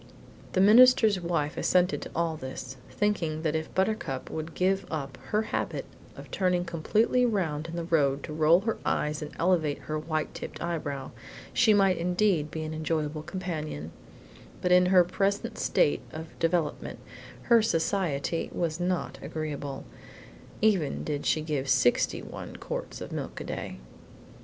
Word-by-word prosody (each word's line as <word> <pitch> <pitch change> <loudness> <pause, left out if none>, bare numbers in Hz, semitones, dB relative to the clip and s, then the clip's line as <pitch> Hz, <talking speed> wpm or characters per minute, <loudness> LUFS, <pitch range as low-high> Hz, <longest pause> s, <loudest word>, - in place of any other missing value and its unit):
The 185 - +3
minister's 220 -2 +7
wife 165 -4 -1
assented 180 +1 +2
to - - -7
all 165 -1 0
this, 130 -2 -7
thinking 170 -7 -1
that 155 -1 0
if 160 0 -3
Buttercup 190 -9 -1
would 160 +1 -5
give 190 +1 +2
up 140 -4 -5
her 215 +1 +1
habit - - -2 0.3
of - - -11
turning 180 -2 +1
completely 210 +9 +2
round 170 -10 0
in 165 - -6
the 170 - -2
road 145 -4 +1
to 150 - -6
roll 160 +3 +5
her 225 +2 -2
eyes 150 +1 0
and 150 - -5
elevate 165 -4 +2
her 155 0 -3
white 155 0 -2
tipped - - -7
eyebrow, 145 -6 -3 0.4
she 225 - +5
might 195 -3 +4
indeed 180 -3 +1
be 160 +1 -4
an 155 0 -4
enjoyable 155 -1 -2
companion; 155 - -5 0.7
but 180 - 0
in 180 0 +6
her 180 -1 +6
present 200 +5 -1
state 145 - +2
of 160 +1 -6
development 165 -2 0 0.5
her 235 -1 +5
society 165 -5 0
was 165 -1 -2
not 180 0 -2
agreeable, 145 -3 -5 0.8
even 190 -9 +2
did 145 -2 -3
she 155 - +2
give 145 -3 -2
sixty 130 -2 +3
one - - -8
quarts - - -5
of - - -6
milk - - -5
a - - -5
day. - - -5
165 Hz, 155 wpm, -28 LUFS, 150-185 Hz, 0.8 s, minister's